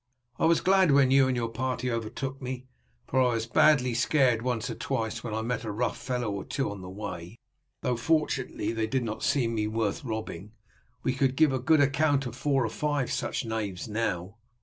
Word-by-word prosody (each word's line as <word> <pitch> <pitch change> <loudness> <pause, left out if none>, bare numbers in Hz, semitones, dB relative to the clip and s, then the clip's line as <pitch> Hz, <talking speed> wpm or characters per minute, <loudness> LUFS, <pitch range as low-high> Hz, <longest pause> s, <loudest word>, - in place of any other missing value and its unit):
I - - +3
was 165 0 +3
glad 190 -1 +4
when 140 -2 +5
you 135 -1 +6
and 130 -1 0
your 115 -1 0
party 125 +1 -2
overtook 130 +4 -4
me, 130 0 -5 0.4
for 130 - +1
I 125 -2 +3
was 115 0 -1
badly 125 +1 +4
scared 125 -1 +3
once 125 -1 -1
or 120 - -3
twice 115 0 -3
when 115 - -4
I 110 - -2
met 125 0 -2
a 110 - -4
rough 115 +4 -1
fellow 125 -4 -2
or 100 -1 -4
two 135 -6 -2
on 100 -2 -8
the 90 - -8
way, 95 -1 -7 0.5
though, 125 - 0
fortunately, 140 -3 0
they 110 -1 -1
did 130 +2 0
not 110 -1 -4
deem 120 -5 0
me 105 -1 0
worth 115 +8 -1
robbing. 110 -4 -5 0.5
We 130 - +1
could 130 0 +1
give 155 -1 +4
a 130 - 0
good 155 +4 +4
account 140 0 +2
of 120 -1 -5
four 135 -1 +1
or - - -1
five 145 -4 -1
of - - -2
such - - -2
knaves 110 -3 -3
now." 105 -3 -2
125 Hz, 215 wpm, -28 LUFS, 110-135 Hz, 0.5 s, you